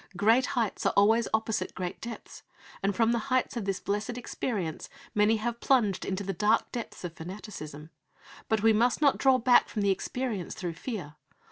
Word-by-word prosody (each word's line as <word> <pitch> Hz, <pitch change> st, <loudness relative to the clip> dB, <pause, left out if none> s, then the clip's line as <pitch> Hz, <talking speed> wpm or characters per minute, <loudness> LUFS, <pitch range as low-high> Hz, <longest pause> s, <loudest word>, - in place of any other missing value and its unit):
Great 225 Hz, +6 st, +4 dB
heights 225 Hz, -4 st, 0 dB
are -, -, +1 dB
always 220 Hz, +3 st, +5 dB
opposite 220 Hz, -4 st, -1 dB
great 180 Hz, -1 st, -4 dB
depths, 235 Hz, 0 st, -8 dB, 0.4 s
and 195 Hz, 0 st, 0 dB
from 230 Hz, +1 st, +3 dB
the 235 Hz, -, +1 dB
heights 255 Hz, 0 st, +1 dB
of 230 Hz, -4 st, -3 dB
this 195 Hz, -1 st, -1 dB
blessed 210 Hz, +4 st, -2 dB
experience 205 Hz, -8 st, -4 dB, 0.2 s
many 210 Hz, +2 st, +3 dB
have 235 Hz, +2 st, -3 dB
plunged 225 Hz, -9 st, +2 dB
into 195 Hz, +1 st, -2 dB
the 195 Hz, 0 st, -3 dB
dark 210 Hz, +5 st, +2 dB
depths 235 Hz, -5 st, -6 dB
of 175 Hz, -2 st, -5 dB
fanaticism. 160 Hz, -4 st, -8 dB, 0.6 s
But 220 Hz, -1 st, +1 dB
we 225 Hz, 0 st, +6 dB
must 235 Hz, +3 st, +2 dB
not 285 Hz, -3 st, +3 dB
draw 265 Hz, -1 st, +5 dB
back 245 Hz, 0 st, +4 dB
from 210 Hz, -, -2 dB
the 200 Hz, -, +3 dB
experience 210 Hz, 0 st, -3 dB
through 175 Hz, -2 st, -4 dB
fear. 175 Hz, -, -6 dB
215 Hz, 180 wpm, -29 LUFS, 190-235 Hz, 0.6 s, we